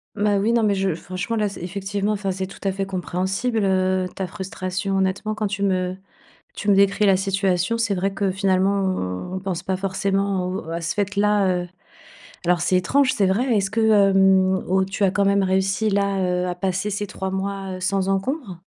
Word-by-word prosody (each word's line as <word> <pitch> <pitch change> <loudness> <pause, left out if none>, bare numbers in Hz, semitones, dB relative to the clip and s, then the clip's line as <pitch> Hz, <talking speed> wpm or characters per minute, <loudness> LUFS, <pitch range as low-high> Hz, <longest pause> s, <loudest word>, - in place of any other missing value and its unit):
Bah 205 -1 +2
oui, 220 +4 +1
non, 230 -2 +3
mais 205 -2 +2
je 190 -4 0
franchement, 185 +6 -4
là, 210 -2 +1
c'est 195 - -9
effectivement 200 +3 -2
enfin, 195 -2 -2
c'est 190 0 -3
tout - - -13
à 195 - +1
fait 195 0 -3
compréhensible, 190 +5 -2
heu, 185 -1 +1
ta 190 -2 -3
frustration. 190 0 -4
Honnêtement, 195 +3 -1
quand 215 -1 -1
tu 200 0 -4
me 185 -1 0 0.6
tu 205 - -3
me 200 - +6
décris 200 +1 +3
la 195 -1 +5
situation, 195 +2 0
c'est 225 -3 0
vrai 195 +2 0
que 195 0 0
finalement, 190 - 0
on 190 - -2
pense 190 -3 -4
pas 190 -1 -1
forcément 195 0 -1
au, 185 - -4
heu 165 - -5
à 170 - -3
ce 165 - -2
fait-là, 205 0 +2 0.2
heu. - - -8 0.8
Alors 175 0 +3
c'est 185 +2 +1
étrange, 255 +9 +3
c'est 200 - +2
vrai. 210 +7 +1
Est-ce 195 -2 0
que, 225 - -1 0.3
hem, 190 -1 +4
au 190 +1 +2
tu 195 +1 0
as 185 - +2
quand 200 0 +1
même 200 0 +3
réussi 190 +3 +1
là, 200 -1 +1
heu, 180 -1 0
à 180 - -2
passer 190 +2 -1
ces 205 0 -3
3 190 0 -5
mois, 195 0 -3
heu, 185 - -8
sans 195 +1 0
encombre? 195 - -2
195 Hz, 210 wpm, -22 LUFS, 185-200 Hz, 0.8 s, me